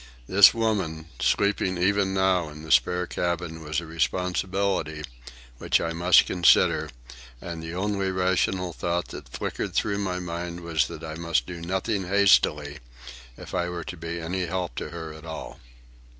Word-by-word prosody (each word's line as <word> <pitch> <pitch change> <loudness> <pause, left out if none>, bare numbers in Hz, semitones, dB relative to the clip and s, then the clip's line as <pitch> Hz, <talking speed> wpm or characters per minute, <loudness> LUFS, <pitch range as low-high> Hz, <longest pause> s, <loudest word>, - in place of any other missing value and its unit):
This 95 +7 +8
woman, 95 -9 -1
sleeping 100 -2 +1
even 95 +2 +2
now 95 -3 +2
in 75 +1 -11
the 80 - -6
spare 90 +9 +3
cabin, 85 -2 -3
was 80 +1 -1
a 85 - -8
responsibility, 90 -1 -1 0.6
which - - +2
I 85 0 -2
must 90 +2 +5
consider, 90 -3 +4 0.5
and 85 +2 -6
the 80 +1 -6
only 100 0 -1
rational 90 -1 0
thought 85 +2 -2
that - - -9
flickered - - -4
through 100 -1 +1
my 95 -3 -2
mind 85 0 -5
was 80 -6 +1
that - - -9
I 80 -1 -5
must 80 -5 0
do 85 +3 -7
nothing 95 +2 -2
hastily 75 -7 +3 0.6
if - - -10
I 90 -1 0
were 85 -1 -5
to - - -7
be 85 +1 -5
any 90 +2 -2
help 90 -3 -3
to - - -4
her 80 -2 -7
at 80 0 -12
all. 80 -1 -7
85 Hz, 165 wpm, -26 LUFS, 80-95 Hz, 0.6 s, This